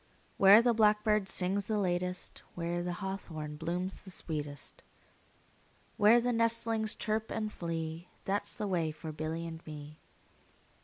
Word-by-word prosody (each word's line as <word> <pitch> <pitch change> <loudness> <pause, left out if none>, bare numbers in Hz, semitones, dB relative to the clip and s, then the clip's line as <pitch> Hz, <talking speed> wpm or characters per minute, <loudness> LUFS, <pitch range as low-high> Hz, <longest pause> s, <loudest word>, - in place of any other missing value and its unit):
Where 200 +4 +8
the 240 -1 +4
blackbird 210 -2 +3
sings 195 +2 0
the 220 - 0
latest, 180 -1 -1
5 - - -27
Where 170 0 -1
the 175 0 -2
hawthorn 160 -6 -5
blooms 175 +4 -3
the 195 - -12
sweetest, 150 -5 -5 1.1
Where 215 +3 +6
the 245 +1 0
nestlings 230 -1 +1
chirp 215 +1 -1
and 215 -1 -3
flee, 165 0 -4 0.2
That 205 +1 0
's - - -3
the 210 - -3
way 170 -4 +1
for 155 +1 -7
Billy 155 +2 -3
and 165 0 -7
me. 150 0 -9
185 Hz, 150 wpm, -32 LUFS, 165-215 Hz, 1.1 s, Where